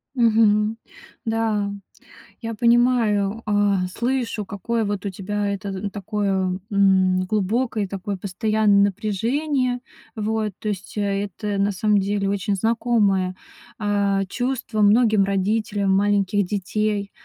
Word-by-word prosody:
Мгм, 220 -2 +3 0.5
да, 220 -3 0 0.7
я 230 -1 -4
понимаю, 230 -3 +2
а, 205 -3 +2
слышу, 235 0 -2
какое 220 +4 -2
вот 205 -2 -3
у - - -1
тебя 205 +2 -3
это 200 0 -4
такое, 195 -2 -1
м, 190 -2 +3
глубокое 215 +3 0
и - - -8
такое 195 +1 -4
постоянное 205 +1 +2
напряжение. 245 +6 -1 0.4
Вот, 215 0 -1
то 215 - -6
есть, 195 -2 -5
это 205 0 -2
на 200 +1 +2
самом 205 +2 +2
деле 200 0 -1
очень 200 0 -1
знакомое, 205 -4 +1 0.4
а, 200 -1 +1
чувство 245 0 -2
многим 215 -1 +4
родителям 200 +1 0
маленьких 200 0 +2
детей. 205 +1 -2
205 Hz, 115 wpm, -22 LUFS, 195-220 Hz, 0.7 s, многим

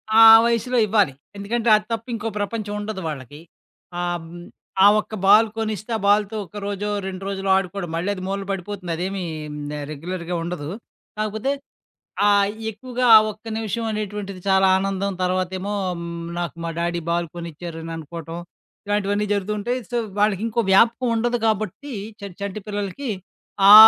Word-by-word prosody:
ఆ 225 - +9 0.2
వయసులో 235 +2 +1
ఇవ్వాలి. 200 -9 +3 0.2
ఎందుకంటే 230 +3 0
అదప్పు 225 +2 -5
ఇంకో 225 0 -3
ప్రపంచం 205 0 -3
ఉండదు 205 -2 -4
వాళ్ళకి. 145 0 -6 0.6
అం 175 -1 -2 0.6
ఆ - - +10
ఒక్క 215 - -6
బాల్ 215 +3 +7
కొనిస్తే 215 0 -3
ఆ - - +1
బాల్‌తో 205 +1 +3
ఒక 205 +5 -11
రోజో 205 +1 -2 0.2
2 190 0 -6
రోజులో 195 -1 -2
ఆడుకోవడం. 190 -2 -3
మళ్ళాది 185 +2 -2
మూలన 195 0 -2
బడిపోతుంది. 195 -2 -4
అదేమీ 185 +2 -3 0.5
ఆహ్, 145 - -4
రెగ్యులర్‌గా 170 +3 -4
ఉండదు. 170 -4 -4 0.5
కాకపోతే 215 +5 -1 0.8
ఆహ్, 200 0 +4 0.2
ఎక్కువగా 250 +4 -4
ఆ - - +13 0.2
ఒక్క 215 +2 -22
నిమిషమనేటువంటిది 210 -3 -3
చాలా 190 0 +5
ఆనందం 195 0 -1
తర్వాతేమో 185 +2 -1 0.3
హ్మ్, 170 0 -5
నాకు 170 -1 -3
మా 165 - -2
డ్యాడీ 170 0 -1
బాల్‌ 170 0 +1
కోనిచ్చారననుకోవటం. 165 0 -6 0.5
ఇలాంటివన్నీ 205 0 +1
జరుగుతూంటాయి. 210 +5 -1
సో 240 - -1 0.2
వాళ్ళకింకో 215 +3 +2
వ్యాపకం 235 +5 +5
ఉండదు 240 +2 +1
కాబట్టి 220 +6 -1 0.3
చ - - -17 0.2
చంటి 200 +1 -4
పిల్లలకి 205 +5 -3 0.6
ఆ - - +12
200 Hz, 135 wpm, -23 LUFS, 180-215 Hz, 0.8 s, ఆ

